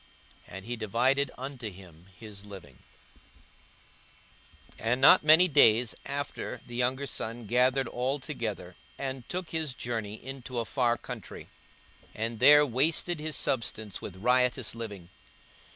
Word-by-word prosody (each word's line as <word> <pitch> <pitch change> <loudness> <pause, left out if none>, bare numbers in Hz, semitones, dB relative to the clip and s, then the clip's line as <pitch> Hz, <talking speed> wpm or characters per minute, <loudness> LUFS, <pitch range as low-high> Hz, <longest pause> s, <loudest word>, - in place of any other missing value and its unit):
And 95 +1 -9
he 120 +1 -3
divided 125 +6 +1
unto 130 -3 -5
them 90 -3 -15
his 105 -3 -9
living. 95 -11 -12 2.0
42:015:013 - - -9
And 125 +2 +2
not 135 - +7
many 160 +4 +7
days 120 -6 +4
after 140 +1 -4
the 120 - -10
younger 130 +3 0
son 115 -3 -5
gathered 125 +3 +2
all 125 +4 -1
together, 115 - -5 0.2
and 130 -3 -5
took 180 -1 -4
his 160 -5 -2
journey 110 -4 -4
into 130 +1 -8
a 115 - -1
far 120 -1 +1
country, - - -9 0.7
and 115 +1 -3
there 150 +3 +8
wasted 155 +6 +1
his 155 0 -3
substance 110 -4 -2
with 90 - -7
riotous 125 +3 +1
living. 105 -7 -8
125 Hz, 135 wpm, -29 LUFS, 110-135 Hz, 2.0 s, there